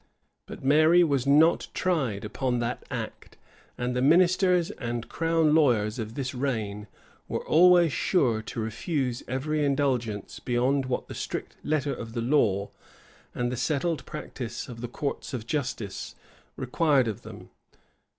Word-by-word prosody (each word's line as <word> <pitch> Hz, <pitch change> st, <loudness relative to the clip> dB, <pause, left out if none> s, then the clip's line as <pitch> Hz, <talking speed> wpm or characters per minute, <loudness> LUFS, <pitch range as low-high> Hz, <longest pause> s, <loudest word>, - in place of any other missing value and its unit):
But -, -, -9 dB
Mary 155 Hz, +5 st, +5 dB
was 140 Hz, -5 st, 0 dB
not 155 Hz, +4 st, +4 dB
tried 135 Hz, -, 0 dB
upon 125 Hz, +3 st, -1 dB
that 120 Hz, +1 st, -3 dB
act; -, -, -6 dB, 0.4 s
and 125 Hz, 0 st, -2 dB
the 125 Hz, -, +1 dB
ministers 180 Hz, +3 st, +4 dB
and 120 Hz, -1 st, -4 dB
crown 165 Hz, -2 st, +2 dB
lawyers 120 Hz, -8 st, +3 dB
of 110 Hz, +1 st, -5 dB
this 135 Hz, -2 st, -3 dB
reign 110 Hz, -6 st, -3 dB, 0.4 s
were -, -, -3 dB
always 175 Hz, -1 st, +5 dB
sure 125 Hz, -, +1 dB
to 110 Hz, -, -7 dB
refuse 125 Hz, -, -2 dB
every 150 Hz, +4 st, -1 dB
indulgence 130 Hz, -7 st, -1 dB
beyond 130 Hz, +2 st, 0 dB
what 125 Hz, -, -2 dB
the -, -, -7 dB
strict -, -, -5 dB
letter 145 Hz, -2 st, 0 dB
of 115 Hz, -1 st, -7 dB
the 120 Hz, -, -2 dB
law, 115 Hz, -7 st, +1 dB, 0.6 s
and 120 Hz, 0 st, -1 dB
the -, -, -2 dB
settled 155 Hz, +5 st, -1 dB
practice 130 Hz, -5 st, -6 dB
of 115 Hz, -2 st, -9 dB
the 120 Hz, -, -3 dB
courts 140 Hz, +2 st, -4 dB
of 115 Hz, -3 st, -5 dB
justice, 125 Hz, -8 st, -4 dB, 0.4 s
required 135 Hz, 0 st, +2 dB
of 105 Hz, -3 st, -4 dB
them. -, -, -11 dB
130 Hz, 145 wpm, -27 LUFS, 120-155 Hz, 0.6 s, Mary